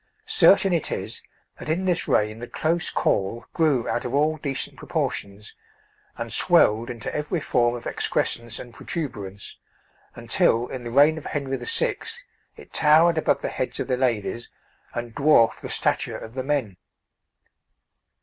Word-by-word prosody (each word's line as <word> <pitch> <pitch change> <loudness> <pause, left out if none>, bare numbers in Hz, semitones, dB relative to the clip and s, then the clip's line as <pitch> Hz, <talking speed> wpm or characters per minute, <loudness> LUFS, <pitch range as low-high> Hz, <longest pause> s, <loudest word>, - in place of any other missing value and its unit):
Certain 200 - +5
it 165 - -1
is - - -4 0.4
that - - -7
in 175 +4 0
this 180 -2 0
reign 105 +1 +1
the 120 - -7
close 170 +2 0
caul 115 +5 -1
grew 145 -7 +2
out - - -1
of 125 +2 -3
all 155 +2 +2
decent 140 -3 -3
proportions, 100 +1 -4 0.6
and - - -3
swelled 110 +3 +4
into 115 -3 -5
every 150 +3 -2
form 120 -4 +1
of 120 - -8
excrescence 115 -2 -1
and 120 -2 -9
protuberance, 105 - -5 0.6
until 115 +2 +2
in 130 -2 -6
the 120 - -5
reign 145 +6 +4
of - - -15
Henry 135 -2 -2
VI. 455 - 0 0.6
it - - -15
towered 160 +2 +5
above - - +1
the - - -1
heads 130 - -3
of - - -2
the 130 - +1
ladies, 120 -2 -1 0.5
and 120 -1 -5
dwarfed 140 -5 +4
the - - -7
stature - - 0
of 110 - -10
the 130 0 -3
men. 130 -9 -1
130 Hz, 155 wpm, -24 LUFS, 115-155 Hz, 0.6 s, Certain